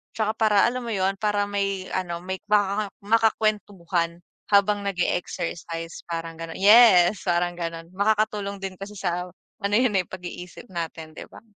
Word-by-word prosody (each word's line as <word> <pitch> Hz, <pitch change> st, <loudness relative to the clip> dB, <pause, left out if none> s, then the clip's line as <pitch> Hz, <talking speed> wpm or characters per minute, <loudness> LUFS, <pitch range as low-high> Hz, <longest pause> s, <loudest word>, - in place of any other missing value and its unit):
Tsaka 220 Hz, -1 st, 0 dB
para 215 Hz, -2 st, +3 dB
alam 250 Hz, 0 st, 0 dB
mo 225 Hz, -, -2 dB
yun? 195 Hz, +1 st, 0 dB
Para 210 Hz, -1 st, +1 dB
may 195 Hz, -2 st, -2 dB
ano 175 Hz, -2 st, -3 dB
may 190 Hz, +1 st, -4 dB
makaka 205 Hz, 0 st, +2 dB, 0.2 s
makakwentuhan 200 Hz, -6 st, 0 dB, 0.2 s
habang 200 Hz, 0 st, +3 dB
nag-e-exercise 175 Hz, -3 st, -3 dB
parang 165 Hz, -1 st, -5 dB
ganun. 165 Hz, 0 st, -7 dB
Yes, 200 Hz, -2 st, +6 dB
parang 175 Hz, -1 st, +1 dB
ganun 165 Hz, -1 st, -5 dB
makakatulong 205 Hz, 0 st, 0 dB
din 195 Hz, -1 st, -4 dB
kasi 200 Hz, +1 st, -8 dB
sa 180 Hz, -1 st, -2 dB, 0.4 s
ano 200 Hz, +1 st, +1 dB
yun 245 Hz, -5 st, +2 dB
eh, 180 Hz, -, +1 dB
pag-iisip 180 Hz, +3 st, -9 dB
natin, 160 Hz, -2 st, -6 dB
'di -, -, -7 dB
ba? 230 Hz, -, -14 dB
195 Hz, 150 wpm, -24 LUFS, 175-210 Hz, 0.4 s, Yes